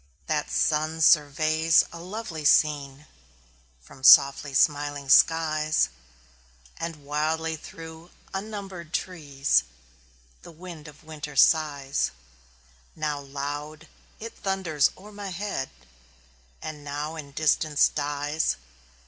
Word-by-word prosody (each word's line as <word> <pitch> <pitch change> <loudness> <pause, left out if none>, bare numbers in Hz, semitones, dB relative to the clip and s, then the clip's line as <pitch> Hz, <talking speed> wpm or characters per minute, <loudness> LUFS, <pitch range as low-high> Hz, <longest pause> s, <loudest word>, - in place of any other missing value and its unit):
That - - -1
sun 155 +1 0
surveys 155 +1 +4
a 170 - -8
lovely 180 -3 -6
scene 145 -1 +2 0.7
From 70 - -17
softly 140 +2 +7
smiling 145 -1 +1
skies; 155 - +4 0.9
And 165 -3 -6
wildly 160 +2 -1
through 165 0 -11 0.2
unnumbered 195 -4 -7
trees 140 - 0 0.8
The - - -12
wind 165 -2 -11
of 150 -1 -14
winter 150 -2 -8
sighs: 145 -2 +2 0.9
Now 150 -2 -2
loud, 145 +3 -6 0.3
it 230 +1 -8
thunders 185 -7 0
o'er 205 +3 -13
my 205 -1 -7
head, 185 -6 -4 0.9
And 150 -2 -7
now 145 +2 -4
in 145 -3 -9
distance 155 0 +3
dies. 145 +1 -1
155 Hz, 100 wpm, -26 LUFS, 145-165 Hz, 0.9 s, softly